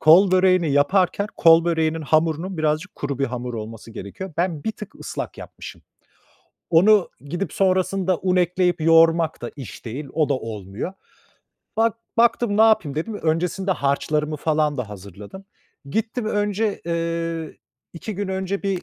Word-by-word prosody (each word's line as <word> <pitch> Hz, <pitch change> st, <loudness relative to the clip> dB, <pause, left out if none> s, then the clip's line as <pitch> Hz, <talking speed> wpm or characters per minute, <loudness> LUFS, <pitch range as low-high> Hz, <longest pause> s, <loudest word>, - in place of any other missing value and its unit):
kol 175 Hz, +5 st, +7 dB
böreğini 185 Hz, -3 st, +4 dB
yaparken 185 Hz, +7 st, +2 dB
kol 165 Hz, -1 st, +6 dB
böreğinin 160 Hz, -1 st, 0 dB
hamurunun 160 Hz, +4 st, +1 dB
birazcık 155 Hz, +5 st, -1 dB
kuru 140 Hz, -2 st, -4 dB
bir 140 Hz, -, +2 dB
hamur 125 Hz, -1 st, -5 dB
olması 115 Hz, 0 st, -7 dB
gerekiyor. 115 Hz, -, -8 dB
Ben 170 Hz, -4 st, -1 dB
bir 220 Hz, -, -1 dB
tık 210 Hz, -, -10 dB
ıslak -, -, -6 dB
yapmışım. -, -, -10 dB, 0.9 s
Onu 190 Hz, +4 st, +5 dB
gidip 175 Hz, +7 st, -4 dB
sonrasında 185 Hz, -1 st, +1 dB
un 185 Hz, -1 st, +1 dB
ekleyip 180 Hz, -1 st, +1 dB
yoğurmak 165 Hz, 0 st, +4 dB
da 120 Hz, -, -5 dB
iş 130 Hz, -6 st, -9 dB
değil, 135 Hz, +6 st, -5 dB
o 155 Hz, -2 st, +1 dB
da -, -, +3 dB
olmuyor. 110 Hz, -, -5 dB, 0.8 s
Bak 225 Hz, 0 st, +2 dB, 0.2 s
baktım 230 Hz, -2 st, +3 dB
ne 220 Hz, -, +6 dB
yapayım, 215 Hz, -10 st, +3 dB
dedim, 190 Hz, +8 st, -3 dB
öncesinde 175 Hz, +4 st, 0 dB
harçlarımı 150 Hz, +1 st, 0 dB
falan 150 Hz, -1 st, 0 dB
da 125 Hz, -5 st, -4 dB
hazırladım. 100 Hz, -, -10 dB, 0.4 s
Gittim 220 Hz, -, -2 dB
önce, 205 Hz, 0 st, 0 dB
eee, 165 Hz, -1 st, -3 dB, 0.4 s
2 205 Hz, +5 st, -6 dB
gün 200 Hz, +1 st, -3 dB
önce 190 Hz, +1 st, -2 dB
bir 195 Hz, -3 st, -1 dB
165 Hz, 145 wpm, -22 LUFS, 145-190 Hz, 0.9 s, kol